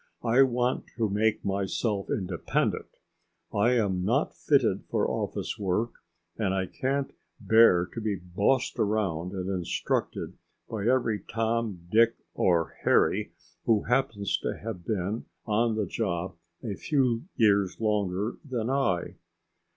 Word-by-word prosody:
"I 120 +3 +4
want 125 -1 +2
to 110 -4 0
make 110 +2 +1
myself 100 +1 -1
independent. 90 -3 -1 0.7
I 110 +4 +3
am 100 -6 +1
not 125 - +1
fitted 125 -10 +2
for - - +1
office - - -3
work, 105 +4 0 0.5
and 95 -3 +1
I 95 -1 0
can't 135 +7 -2 0.3
bear 110 -6 +5
to 115 - -4
be 105 -2 0
bossed 100 +8 0
around 95 -5 0
and 95 -1 -3
instructed 90 -3 -2 0.3
by 110 -1 -3
every 120 -4 +2
Tom, 110 -5 -2
Dick, 115 +1 +5 0.2
or 85 -3 +1
Harry - - +2 0.3
who 110 -3 +3
happens 115 -5 0
to - - -3
have 105 -5 -6
been 105 +1 -2 0.2
on 115 +1 +1
the 110 -2 0
job 90 -2 -2 0.3
a 110 -4 -3
few 125 - 0
years 100 -5 +3
longer 105 -1 0
than 125 -4 -2
I." 135 -11 0
105 Hz, 130 wpm, -28 LUFS, 95-115 Hz, 0.7 s, bear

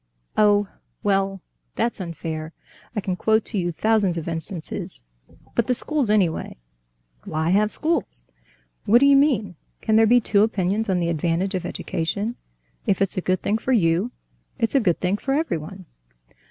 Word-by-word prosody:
"Oh, 205 -1 +4 0.4
well, 195 -1 +1 0.3
that's 235 -4 -1
unfair... 160 -2 -5 0.4
I 210 - 0
can 185 -1 -2
quote 220 +3 +2
to 210 - -2
you 175 -1 -1
thousands 205 -1 +1
of 165 - -4
instances.... 165 - -5 0.5
But 235 - +1
the 250 - +2
schools, 290 -3 -1
anyway." 195 -6 +1 0.7
"Why 160 +2 -1
have 210 +2 +3
schools?" 285 - -2 0.6
"What 230 - +6
do 280 - +5
you 280 0 +7
mean? 245 - +2 0.2
Can 220 -1 +2
there 225 0 +6
be 245 +2 +6
two 205 -3 +2
opinions 210 0 +1
of 185 - +2
the 170 -1 0
advantage 170 +4 0
of 180 -2 -2
education? 200 +10 -3 0.5
If 195 - +2
it's 195 -2 0
a - - +1
good 185 +1 0
thing 215 +2 +1
for 260 - 0
you, 175 0 +2 0.5
it's 230 - 0
a 275 - +5
good 180 -9 +1
thing 185 +2 0
for 270 +5 -1
everyone." 190 - -3
195 Hz, 165 wpm, -23 LUFS, 175-225 Hz, 0.7 s, you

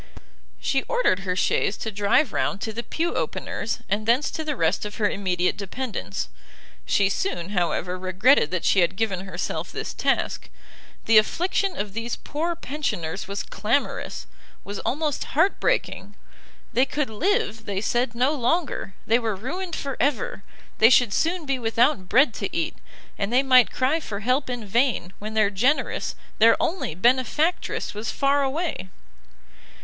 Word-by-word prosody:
She 270 -2 +1
ordered - - +2
her 185 -2 -2
chaise 195 - +1
to 220 - -4
drive 205 +6 +2
round 200 - 0
to 220 - -3
the 235 - -3
pew 330 +7 -2
opener's 225 - -3
and 210 +2 -1
thence 250 +5 +3
to 315 - -4
the 300 -2 -2
rest 165 -3 +1
of 210 0 -5
her 210 -3 +2
immediate 180 -3 0
dependents. 200 - -4 0.6
She 200 - +3
soon, 195 - -2
however, 180 -1 -1
regretted 185 - +3
that 180 -2 -2
she 195 - +4
had 180 +1 +2
given 195 -3 -2
herself 180 -1 -4
this - - -5
task; - - -1 0.6
the 225 -1 +7
affliction 365 - 0
of 205 -1 -3
these 230 +2 -3
poor 330 +4 -3
pensioners 210 - -3
was 200 0 -3
clamorous, 215 +8 -2 0.4
was 200 0 -6
almost 300 +2 -1
heart 330 +6 +3
breaking; - - -1 0.6
they 255 +3 +4
could 290 -3 -2
live, 225 - 0
they 200 -1 -2
said, 240 +2 0
no 255 +5 +2
longer, 290 - -1
they 230 +2 +3
were 225 -3 -1
ruined 335 - -4
for 275 -2 -4
ever; 275 -7 0 0.4
they 225 - +8
should 245 -4 +4
soon 335 - 0
be 270 -2 -1
without 230 -3 +1
bread 255 0 +5
to 200 - -3
eat, 165 - -1 0.4
and 200 +2 -1
they 255 +3 +4
might 255 -3 +6
cry 265 +5 +1
for 205 -9 -6
help 255 +5 +1
in 245 -3 -4
vain, 215 -4 +1
when 215 +1 -6
their 215 -2 +3
generous, 250 +10 0 0.2
their 230 +1 +6
only 325 - -1
benefactress 260 - +1
was 215 +2 -4
far 280 0 +2
away! 275 - -2
230 Hz, 160 wpm, -24 LUFS, 200-280 Hz, 0.6 s, they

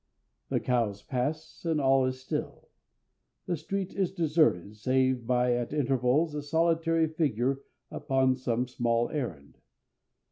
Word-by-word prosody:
The - - +1
cows 115 -5 0
pass 150 +5 -3
and 165 -3 +1
all 135 -1 +4
is 130 0 -3
still. 130 - -5 0.8
The 175 - -1
street 190 +4 -4
is 190 -3 0
deserted, 150 - +1
save 130 +1 +1
by, 125 0 +2
at 120 +2 -2
intervals, 135 +2 +1
a 150 - -3
solitary 165 +2 +2
figure 135 -5 0 0.3
upon 135 -3 +1
some 125 -1 -1
small 120 -1 0
errand. 90 - -5
130 Hz, 130 wpm, -29 LUFS, 125-155 Hz, 0.8 s, all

